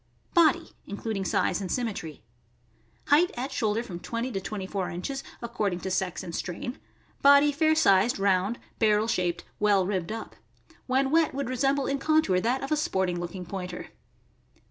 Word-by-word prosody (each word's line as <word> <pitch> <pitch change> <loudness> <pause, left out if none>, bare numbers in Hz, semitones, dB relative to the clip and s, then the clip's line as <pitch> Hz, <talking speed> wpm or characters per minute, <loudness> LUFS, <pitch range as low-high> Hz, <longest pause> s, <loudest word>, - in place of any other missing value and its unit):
Body 340 -1 +4 0.2
(including 205 0 -3
size 190 - 0
and 185 - -4
symmetry). 195 - -3 0.4
— 115 - -37
Height 320 +5 +5
at 260 +3 -3
shoul 220 -5 0
der 230 - -1
from 180 -7 -7
twenty 230 +6 -3
to 195 -4 -3
twenty 195 0 -5
four 190 -1 -3
inches, 270 +11 -4 0.2
according 210 -6 -1
to 190 - -4
sex 185 -1 -1
and 170 - -7
strain; 185 +10 -4 0.4
body 285 +1 +7
fair 315 +2 +3
sized, 215 -7 +4
round, 195 +3 +1 0.2
barrel 215 -1 +3
shaped, 180 -6 -1 0.2
well 205 -3 +3
ribbed 185 -2 -2
up. 225 0 -6 0.5
When 265 +1 +2
wet 320 -3 +3
would 280 -2 -2
resemble 270 +2 +1
in 275 0 -1
contour 310 -11 +3
that 245 +7 0
of 270 - -5
a 305 - +3
sporting 190 -11 0
looking 175 +1 -5
Pointer. 180 0 -6
215 Hz, 170 wpm, -27 LUFS, 185-270 Hz, 0.5 s, body